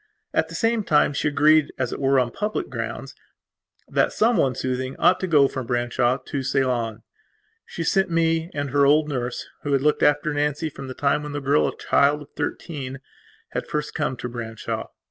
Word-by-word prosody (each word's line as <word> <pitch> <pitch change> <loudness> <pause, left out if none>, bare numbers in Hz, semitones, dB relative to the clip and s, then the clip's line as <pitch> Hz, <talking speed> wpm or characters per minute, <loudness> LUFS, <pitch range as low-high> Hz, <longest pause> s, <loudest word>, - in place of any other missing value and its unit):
At - - +1
the - - -8
same 225 -1 +1
time 150 -4 +3
she 140 - 0
agreed, 150 +1 +4
as 130 -3 -2
it - - -5
were, 135 0 +3
on 120 -2 0
public 210 - -3
grounds, - - -5 0.7
that - - +1
someone 215 - +2
soothing 130 0 -3
ought 185 - +4
to 185 - -2
go 145 -5 +5
from 130 -3 -5
Branshaw 120 +1 +1
to 140 +1 -5
Ceylon. 125 -4 -1 0.6
She 170 - -5
sent 190 +3 +2
me 165 0 +1
and 145 -2 -3
her 140 0 +3
old 150 +1 +4
nurse, 125 -4 -3 0.2
who 145 - -2
had 135 -1 +2
looked 150 0 +2
after 145 +1 +3
Nancy 150 +2 -1
from 135 -1 -8
the 130 - -7
time 140 +1 +1
when 150 -1 -6
the 145 - -2
girl, 140 +2 +2
a - - -5
child 145 +1 +2
of 145 - -19
thirteen, 135 -5 -4 0.5
had - - -4
first 150 0 -3
come 145 -4 -2
to 125 - -5
Branshaw. 115 -2 -5
145 Hz, 195 wpm, -23 LUFS, 130-150 Hz, 0.7 s, go